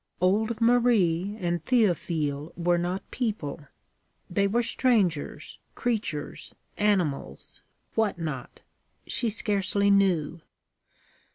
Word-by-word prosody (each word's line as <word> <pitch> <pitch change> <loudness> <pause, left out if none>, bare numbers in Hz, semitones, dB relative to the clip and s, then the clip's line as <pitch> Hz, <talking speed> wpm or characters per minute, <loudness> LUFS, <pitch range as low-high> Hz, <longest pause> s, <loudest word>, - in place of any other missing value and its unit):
Old 215 +5 +1
Marie 215 -6 +3
and 175 -2 -1
Théophile 165 - 0
were 175 0 +2
not 180 +3 -3
people: 165 - -3 0.6
they 200 +2 +2
were 235 +4 +1
strangers, 205 - 0 0.2
creatures, 215 -11 -3 0.2
animals 180 - -1 0.3
what 220 -4 +1
not. 155 -7 -6 0.4
She 235 - 0
scarcely 200 -1 +1
knew. 175 -5 +2
190 Hz, 90 wpm, -27 LUFS, 165-220 Hz, 0.6 s, Marie